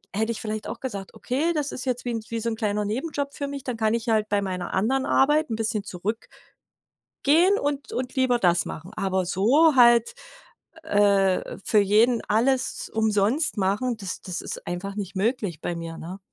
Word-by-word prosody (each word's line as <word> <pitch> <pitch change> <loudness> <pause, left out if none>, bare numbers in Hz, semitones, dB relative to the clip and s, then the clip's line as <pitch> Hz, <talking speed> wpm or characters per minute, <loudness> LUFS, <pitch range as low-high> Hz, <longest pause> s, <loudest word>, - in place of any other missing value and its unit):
hätte 220 +2 0
ich 220 - -5
vielleicht 215 -1 -4
auch - - -6
gesagt: 200 -7 -6
„Okay, 285 +7 -1
das 295 -2 -2
ist 255 - -5
jetzt 250 -1 -2
wie 240 - -1
'n 225 - -2
wie 230 - -2
so 230 +1 -1
'n 225 - -3
kleiner 210 -1 -1
Nebenjob 280 +5 -3
für 280 - -3
mich, 280 -1 -6
dann 250 -4 -4
kann 220 0 +1
ich 235 0 -2
halt 215 -1 +1
bei 205 -1 +1
meiner 185 -2 -4
anderen 260 +8 +1
Arbeit 295 +1 +3
'n 225 - -1
bisschen 220 -2 -1
zurück“ 200 +3 -3 1.1
„gehen 345 +8 +5
und 285 -3 -3
und 250 0 -4
lieber 260 -2 +3
das 175 -5 +2
machen.“ 170 +4 -8
Aber 190 -1 0
so 265 - +4
halt 240 -2 +6 0.7
äh, 200 -7 +2
für 215 - +3
jeden 220 +4 +3
alles 255 +4 +1
umsonst 220 +6 +1
machen, 205 +6 0
das 195 -4 -6
das 180 -2 -5
ist - - -7
einfach 185 +3 -4
nicht 200 -2 -5
möglich 200 - -1
bei 175 - -3
mir, 165 -1 -6
ne? 180 +4 -8
220 Hz, 195 wpm, -25 LUFS, 195-255 Hz, 1.1 s, halt